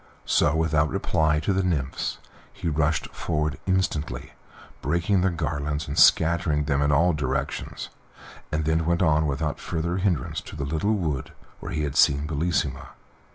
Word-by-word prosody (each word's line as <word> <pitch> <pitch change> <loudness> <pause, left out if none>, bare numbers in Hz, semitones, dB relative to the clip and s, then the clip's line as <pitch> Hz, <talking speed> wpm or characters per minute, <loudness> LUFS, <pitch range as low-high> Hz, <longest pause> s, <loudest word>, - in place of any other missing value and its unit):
So, - - +3
without 80 -2 +2
reply 75 +3 +1
to 95 - 0
the 95 - +1
nymphs, 75 -8 -2 0.3
he - - -6
rushed 80 +1 0
forward 75 -4 -2
instantly, 80 -9 -1 0.5
breaking 85 +6 +1
their 95 - +3
garlands, 75 -2 -2
and 70 - -4
scattering 80 -2 +4
them 70 -1 0
in 75 +1 +2
all 85 +5 +4
directions; 70 -4 -3 0.6
and 75 0 -1
then 80 +1 +1
went 85 +2 +2
on 80 -2 +3
without 75 +2 -2
further 85 +2 -2
hindrance 90 -8 -1
to - - -11
the 70 -2 -3
little 80 +9 0
wood 75 -9 -3 0.3
where 85 - -7
he 80 -4 -1
had 70 -2 -3
seen 70 +1 +4
Bellissima. 75 -3 -2
80 Hz, 155 wpm, -25 LUFS, 75-85 Hz, 0.6 s, scattering